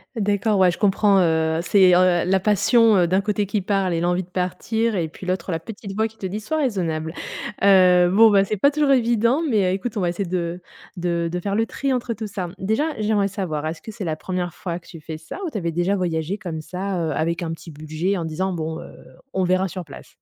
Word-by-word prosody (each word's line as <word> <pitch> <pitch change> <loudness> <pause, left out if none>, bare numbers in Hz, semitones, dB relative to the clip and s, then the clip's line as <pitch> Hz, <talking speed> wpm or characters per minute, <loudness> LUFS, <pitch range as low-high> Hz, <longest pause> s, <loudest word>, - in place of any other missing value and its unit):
D'accord. 205 -1 +1
Ouais, 185 -2 +5
je - - -8
comprends, 200 -1 +3
heu, 160 -2 +2
c'est, 185 +1 +5
heu, 180 -1 +4
la 190 +1 +2
passion 210 0 +4
d'un 185 +3 +2
côté 210 0 -1
qui 200 +1 -1
parle 195 -2 0
et 165 - -1
l'envie 175 +2 +1
de - - -17
partir, 220 +5 -1
et 165 -4 -1
puis 180 +3 -11
l'autre, 185 0 -2
la 165 - -1
petite 200 +3 -8
voix 220 +1 +1
qui 220 0 -19
te 195 - -6
dit: 195 +3 -3
«Soit 315 +9 -3
raisonnable». 170 - -1 0.5
Heu, 180 -2 +6
bon, 220 +4 +6
bah, 200 -1 +5
c'est 210 +2 -2
pas 280 +9 +4
toujours 290 -1 +2
évident, 240 +2 +3
mais 200 -7 +2
écoute, 210 +4 -5
on 205 - -1
va 175 - +1
essayer 175 +3 -3
de 175 -1 -2 0.4
de 170 -1 -1
de 180 - -2
faire 200 +2 -3
le 225 +1 +1
tri 275 +2 -2
entre 245 -2 -2
tout 220 +1 -6
ça. 185 -4 -4
Déjà, 220 +10 0
j'aimerais 210 -2 +1
savoir, 180 -7 -3
est-ce 160 0 -5
que 220 - -8
c'est 205 -3 -6
la 155 - -1
1re 180 +1 -4
fois 175 -2 -4
que 170 - -23
tu 165 - -11
fais 155 0 -7
ça? 160 - -9
Ou 335 - -3
tu 225 - -4
avais 170 -4 -2
déjà 175 +4 0
voyagé 175 0 -2
comme 170 -6 -5
ça, 185 +3 -4
heu, - - -1
avec 165 +3 -1
un 165 - -3
petit 165 +1 -8
budget 155 +6 -2
en 170 - -3
disant: 185 +4 -2
«Bon, 160 -1 -4
heu, - - -12 0.4
on 190 - +1
verra 185 +1 +2
sur 185 -1 -7
place»? 145 - -12
185 Hz, 245 wpm, -22 LUFS, 170-210 Hz, 0.5 s, Heu